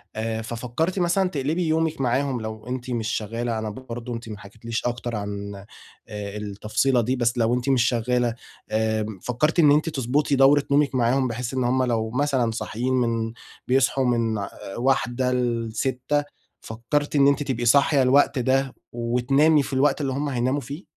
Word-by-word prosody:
آآ، 110 0 -2
ففكرتِ 120 - -2
مثلًا 180 +2 +2
تقلبي 160 +3 -1
يومِك 160 -2 0
معاهم 130 0 0
لو 110 +1 -7
أنتِ 125 0 -4
مش 115 -2 -2
شغالة، 115 +1 -2
أنا 110 - -3
برضه 120 +1 -7
أنتِ 115 -1 -7
ما 105 - -6
حكيتِليش 110 +3 -6
أكتر 120 -1 -2
عن 100 0 -5 0.5
آآ، 105 0 -6
التفصيلة 105 +5 0
دي، 125 +3 0
بس 120 0 0
لو 115 +1 +2
أنتِ 125 +2 -2
مش 130 -3 +4
شغالة 120 0 +1 0.3
آآ، 110 0 0 0.2
فكرتِ 150 +8 0
إن 150 -3 +6
أنتِ 155 +3 +3
تضبُطي 140 +1 0
دورة 140 +2 +5
نومِك 140 -1 +3
معاهم 130 +2 +2
بحيث 120 +2 -4
إن 130 - 0
هم 130 +1 +2
لو 115 -3 0
مثلًا 130 -3 +1
صاحيين 120 +3 -3
من 115 -2 0 0.3
بيصحوا 135 +1 +2
من 115 -3 +1 0.4
01:00 125 0 +1
ل06:00 125 +3 -1 0.4
فكرتِ 125 +7 -2
إن 140 -1 +5
أنتِ 140 +1 +2
تبقي 120 -3 -2
صاحية 140 +3 +4
الوقت 135 +1 +4
ده، 130 +1 +1 0.2
وتنامي 130 +6 +2
في 135 - -7
الوقت 135 +3 +2
اللي 135 -2 -1
هم 145 +2 -2
هيناموا 130 +2 0
فيه؟ 145 +8 -8
125 Hz, 165 wpm, -24 LUFS, 115-140 Hz, 0.5 s, إن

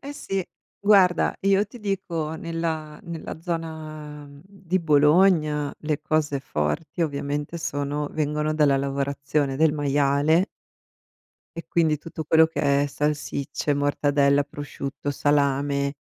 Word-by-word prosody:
Eh 280 +1 -7
sì. 195 -9 -3 0.4
Guarda, 195 -4 +4
io 195 +1 +3
ti 240 +4 -12
dico 175 -6 -3
nella 160 -2 -4
nella 170 -3 -7
zona, 155 -3 -6
mhmm, 140 0 -14
di 190 -2 -2
Bologna, 150 -1 +3
le 150 -1 -2
cose 155 -2 0
forti 135 - -2
ovviamente 145 +1 -3
sono 145 -1 -2
vengono 150 0 -1
dalla 150 -3 +4
lavorazione 140 0 -1
del 160 0 +4
maiale 145 +4 +2 1.1
e 165 - -7
quindi 160 -3 +2
tutto 160 +1 -7
quello 160 +1 +5
che 140 -3 +1
è - - -1
salsicce, 145 0 -2
mortadella, 145 0 +2
prosciutto, 145 0 -5
salame, 140 0 +1
150 Hz, 120 wpm, -24 LUFS, 145-165 Hz, 1.1 s, quello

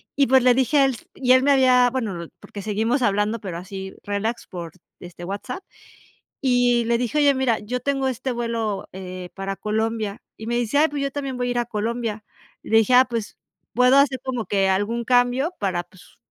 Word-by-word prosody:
y 275 -1 +3
pues 265 +1 +5
le 250 0 +5
dije 265 +4 +2
a 275 - +6
él 270 - +2
s 235 - -12
y 255 -2 +3
él 260 0 +5
me 285 - +4
había 255 -2 +5
bueno, 210 -10 -3
porque 205 - -9
seguimos 220 +6 0
hablando, 210 +1 +1
pero 185 -5 -5
así 190 +1 -7
relax 205 +3 -3
por, 170 -3 -7 0.3
este, 175 0 -9
WhatsApp 200 - -5 0.8
y 245 -2 +3
le 235 +1 +2
dije: 245 +3 -2
"Oye, 285 -1 +5
mira, 260 -4 +1
yo 245 +4 -4
tengo 270 0 0
este 255 +1 -3
vuelo, 230 -4 -3
eh, 185 -1 -7
para 195 0 -4
Colombia" 220 -1 -2 0.2
y 220 - -9
me 240 +1 -1
dice: 240 +3 -1
"Ay, 310 +2 +5
pues 290 -2 -4
yo 275 - -1
también 275 -2 -4
voy 245 0 -1
a - - -1
ir 245 - -1
a 240 - +1
Colombia", 225 -1 -3 0.4
y - - -12
le 225 - +4
dije: 225 +3 +2
"Ah, 255 +1 +7
pues 230 -3 -4 0.4
puedo 250 +2 +5
hacer 275 -2 +4
como 250 -4 -3
que 195 -1 +1
algún 205 +5 0
cambio 250 +7 +2
para 185 -3 -1
pues 185 - -20
235 Hz, 215 wpm, -23 LUFS, 205-255 Hz, 0.8 s, Ah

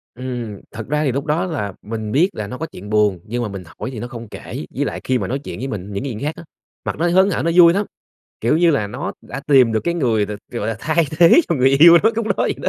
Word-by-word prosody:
Ừm, 120 -5 -5
thật 110 -1 -7
ra 150 +2 0
thì 140 - +1
lúc 140 +3 -3
đó 160 +5 0
là 125 - -3
mình 110 0 -5
biết 165 - +3
là 105 - -4
nó 125 - -7
có 160 - -3
chuyện 105 - -11
buồn 105 -3 +2
nhưng 120 +3 -3
mà 110 - -3
mình 100 -2 -7 0.2
hỏi - - -4
thì 120 - -7
nó 120 - -5
không 120 -2 -9
kể, - - -7
với - - 0
lại - - -4
khi 130 - +1
mà - - -3
nói 135 +3 -2
chuyện 145 - -8
với 135 - -3
mình 100 -4 -6
những 100 - -3
cái 140 - -3
chuyện 105 - -6
khác 150 +2 -2
á, - - -10 0.4
mặt - - -2
nó 170 - +1
hớn 190 +3 +4
hở 185 - -1
nó 170 - +1
vui 170 -1 +8
lắm, 200 +2 0 0.6
kiểu, 120 +7 +2
như 170 0 +4
là 135 -9 +1
nó 100 - -5
đã 135 - -7
tìm 130 -6 +5
được 110 - +1
cái 170 - 0
người 115 -10 +1
t - - -15 0.2
gọi 120 - -3
là, 115 - -2
thay 160 +6 +1
thế 175 - +7
cho 170 - +1
người 130 -2 +4
yêu 165 +5 +8
nó 220 - +5
lúc 230 0 -2
đó - - +2
vậy - - +1
đó. - - +1
130 Hz, 305 wpm, -19 LUFS, 110-165 Hz, 0.6 s, vui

